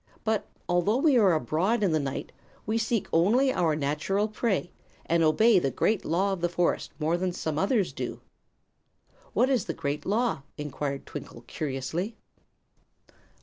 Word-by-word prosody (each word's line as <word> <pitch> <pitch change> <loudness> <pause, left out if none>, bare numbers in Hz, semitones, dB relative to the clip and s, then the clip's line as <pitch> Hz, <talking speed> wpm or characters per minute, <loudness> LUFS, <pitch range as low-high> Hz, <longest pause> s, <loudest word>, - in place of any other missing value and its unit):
But, 220 -1 0 0.2
although 175 +6 +2
we 285 0 +4
are 195 -5 +5
abroad 190 +9 +1
in 190 - +3
the 155 - +2
night, 140 -2 -4 0.3
we 220 +2 0
seek 225 -2 0
only 240 +11 +4
our 165 -4 +2
natural 155 +8 0
prey, 210 -4 -1 0.3
and 170 0 +2
obey 195 +7 +5
the 135 - 0
Great 210 - 0
Law 190 +5 +1
of 185 - -5
the 175 - +1
forest 175 0 0
more 165 +2 +1
than 180 +1 -1
some 160 -3 -3
others 200 0 +1
do." - - -5 1.1
"What 250 - +3
is 260 -7 +1
the 165 - -4
Great 145 +1 -3
Law?" 215 - 0 0.2
enquired 145 -1 -4
Twinkle, - - -8
curiously. 155 - -3
180 Hz, 155 wpm, -27 LUFS, 155-215 Hz, 1.1 s, are